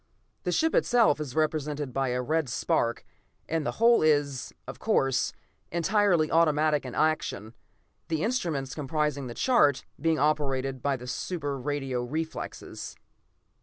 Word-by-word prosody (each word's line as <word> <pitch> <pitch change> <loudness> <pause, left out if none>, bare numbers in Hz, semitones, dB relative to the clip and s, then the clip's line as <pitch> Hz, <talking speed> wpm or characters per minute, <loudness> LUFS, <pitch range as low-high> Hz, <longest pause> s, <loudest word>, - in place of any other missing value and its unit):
The - - +1
ship 320 0 +2
itself 235 -11 +4
is 135 -4 -6
represented 150 -3 -1
by 135 +1 0
a 125 0 -1
red 155 0 0
spark 120 0 0 0.4
and 165 -1 -1
the - - -2
whole 235 +1 +5
is, 145 -4 +1 0.2
of - - -8
course, 135 -1 +1 0.4
entirely 175 -1 +2
automatic 155 -3 +3
in 125 - -7
action, 150 -8 0 0.5
the 160 -1 -1
instruments 165 - -1
comprising 150 -2 -1
the 120 - -7
chart 150 - +3
being 160 +2 +2
operated 135 -3 0
by 140 0 0
super 145 +1 -3
radio 135 -2 -2
reflexes. 155 +6 -5
150 Hz, 130 wpm, -28 LUFS, 135-160 Hz, 0.5 s, whole